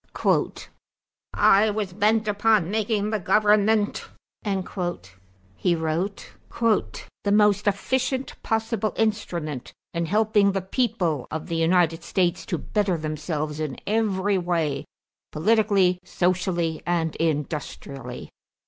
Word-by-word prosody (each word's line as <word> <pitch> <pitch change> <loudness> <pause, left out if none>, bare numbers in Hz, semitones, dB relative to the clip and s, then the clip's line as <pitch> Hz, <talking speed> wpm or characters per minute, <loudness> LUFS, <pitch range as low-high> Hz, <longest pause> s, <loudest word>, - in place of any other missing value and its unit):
"I 205 +3 +5
was 205 -3 -3
bent 215 +2 +2
upon 210 -3 +2
making 215 -1 0
the 215 - 0
government," 210 +2 +2 0.4
he 95 - -4
wrote, 165 +5 -3 0.9
"the 200 - +1
most 210 0 +4
efficient 260 +6 0
possible 225 -1 -1
instrument 175 - -2 0.2
in 170 0 -1
helping 210 0 +3
the 195 - -1
people 185 - -1
of 155 0 -4
the 170 - -3
United 165 0 +2
States 175 -2 0
to 175 - -1
better 195 0 0
themselves 155 0 -3
in 150 -5 -3
every 205 -2 +1
way, 165 -5 -1 0.5
politically, 195 0 +3
socially, 175 -3 0
and 165 -2 0
industrially. 145 -5 -4
185 Hz, 105 wpm, -24 LUFS, 160-210 Hz, 0.9 s, I